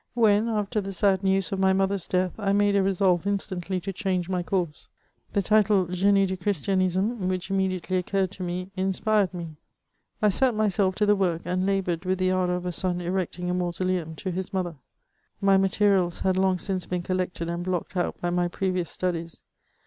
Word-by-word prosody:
When, 220 -1 +3
after 210 0 -1
the 195 0 -5
sad 190 0 +2
news 195 -1 +1
of 195 - -2
my 190 0 +4
motber's 195 -1 0
death, 185 0 0
I 200 -2 +1
made 205 0 +3
a 200 - +4
resolye 190 -2 +2
instantly 190 -2 -2
to 195 +2 -4
change 185 -2 -1
my 180 -1 0
course, 175 -4 -2 0.4
the 200 - +1
title 210 -2 +3
Grenie 195 +3 +3
du 190 0 -2
Christianisme, 190 - 0
which 185 +1 -3
immediately 185 -1 0
occurred 190 +1 0
to 195 - -9
me, 180 +1 -4
inspired 195 +1 +1
me; 170 -4 -7 0.6
I 210 - +4
set 250 +4 +2
myself 200 -3 +1
to 210 - +2
the 205 0 +4
work, 175 -4 0
and 185 +2 0
laboured 185 -3 0
with 185 0 0
the 185 0 +1
anlour 180 -1 +1
of 180 0 -5
a 180 - -1
son 180 0 0
erecting 180 0 -2
a - - 0
mausoleum 180 -2 -1
to 185 +4 -4
his 185 +1 -4
mother. 180 -4 -2 0.6
My 195 -1 +4
materials 195 -2 +2
had 190 -1 +2
long 190 0 +2
since 185 -1 -3
been 180 -1 -2
collected 180 -2 -2
and 170 +1 -3
blocked 185 0 -3
out 175 - -1
by 175 - -1
my 175 0 +1
previous 185 -1 -2
studies. 170 -3 -3
185 Hz, 195 wpm, -26 LUFS, 180-195 Hz, 0.6 s, my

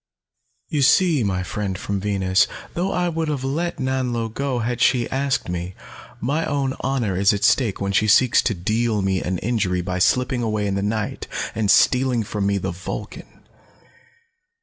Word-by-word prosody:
"You 150 - 0
see, 155 0 +4
my 95 -3 -1
friend 95 0 -3
from 100 +1 -3
Venus, 95 -2 +2 0.3
though 185 +3 -1
I 180 0 0
would 165 -1 -2
have 145 -4 -2
let 160 +6 -2
Nanlo 125 -4 -2
go 135 -1 -2
had 120 +1 -2
she 125 -2 +3
asked 135 +1 0
me, 90 +1 -4 0.4
my 145 +8 -1
own 140 -4 -1
honor 125 -8 -1
is 100 +3 +3
at 100 0 -3
stake 110 -2 +2
when 100 0 -1
she 110 +2 +2
seeks 120 +4 +5
to 110 - +1
deal 110 +3 0
me 95 -1 0
an 90 +1 -2
injury 100 -4 -1
by 90 0 -3
slipping 125 +5 +2
away 110 -2 -1
in 100 - -1
the 100 - -1
night, 105 +1 -3 0.3
and 105 -2 -1
stealing 125 -1 +3
from 100 -1 -2
me 100 0 +1
the 95 -1 -3
Vulcan. 85 +2 -8
110 Hz, 175 wpm, -22 LUFS, 100-130 Hz, 0.4 s, seeks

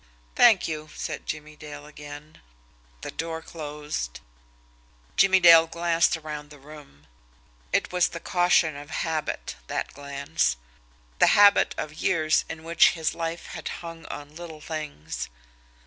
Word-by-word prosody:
"Thank 225 -6 +6
you," 155 -1 -5
said - - -5
Jimmie 155 0 -5
Dale 145 -1 -10
again. 150 +1 -11 0.6
The - - -6
door 165 0 -4
closed. 150 - -5 1.0
Jimmie 190 -1 +5
Dale 165 -2 +8
glanced 170 0 +2
around 150 -2 -7
the 150 - -13
room. 140 - -14 0.7
It - - +1
was 180 -1 +3
the 170 - -7
caution 175 -3 +2
of 145 +1 -9
habit, 160 -2 -3
that - - -3
glance; 140 - -1 0.6
the - - +6
habit 205 0 +6
of 155 - -4
years 155 -4 +2
in 160 0 -7
which 165 +1 +5
his 160 -2 -1
life 165 0 -4
had - - -6 0.2
hung 165 -1 -9
on 145 +1 -8
little 165 -2 -9
things. 150 - -6
155 Hz, 135 wpm, -26 LUFS, 150-165 Hz, 1.0 s, Dale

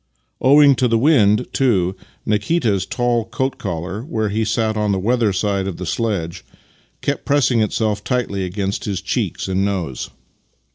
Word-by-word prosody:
Owing 140 +1 +6
to 125 - +2
the 115 -1 +2
wind, 120 -4 +4
too, 95 -9 +1 0.3
Nikita's 105 - 0
tall 120 -1 0
coat 130 +2 -3
collar, 95 +2 -4
where 110 -6 -2
he 110 +2 0
sat 110 0 0
on 105 -1 0
the 100 - +1
weather 115 +2 +1
side 100 0 -1
of 95 - -5
the 90 - -5
sledge, 90 -3 -2 0.6
kept - - -1
pressing 130 -5 +2
itself 105 0 -1
tightly 120 -7 -1
against 95 +2 -3
his 100 -3 -2
cheeks 95 +1 -2
and 95 +1 0
nose. 90 -10 -3
105 Hz, 155 wpm, -19 LUFS, 95-120 Hz, 0.6 s, Owing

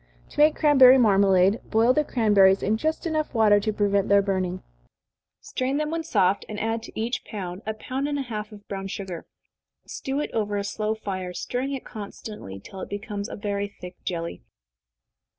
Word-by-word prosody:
To - - -9
make 300 +1 +6
cranberry 265 -4 +7
marmalade, 195 -3 +4
boil 230 +3 +4
the 300 - +2
cranberries 205 -7 +4
in 210 - +2
just 315 +10 -2
water - - 0 0.5
enough 205 - +1
to 215 - +2
prevent 200 -1 +1
their 200 0 +5
burning. 185 -2 -2 0.8
Strain 260 +2 -2
them 305 0 -1
when 330 0 -1
soft, 200 - +2
and 210 -1 -5
add 225 +1 -1
to - - -9
each 235 +3 -2
pound 185 -3 -6
a 220 - -2
pound 260 +5 -3
and 290 -1 -1
a 275 - -1
half 215 -4 -5
of 205 -1 -13
brown 195 -1 -4
sugar. 190 -3 -6 0.6
Stew 270 +1 -4
it 295 - -3
over 210 -2 -1
a 200 - -1
slow 215 +1 -2
fire, 185 -4 -5
stirring 265 +3 -3
it 270 - -5
constantly, 205 - -8
till 190 - -10
it - - -6
becomes 205 0 -5
very 205 -1 -2
thick 180 0 -8
jelly. 170 -2 -4
210 Hz, 185 wpm, -25 LUFS, 195-245 Hz, 0.8 s, cranberry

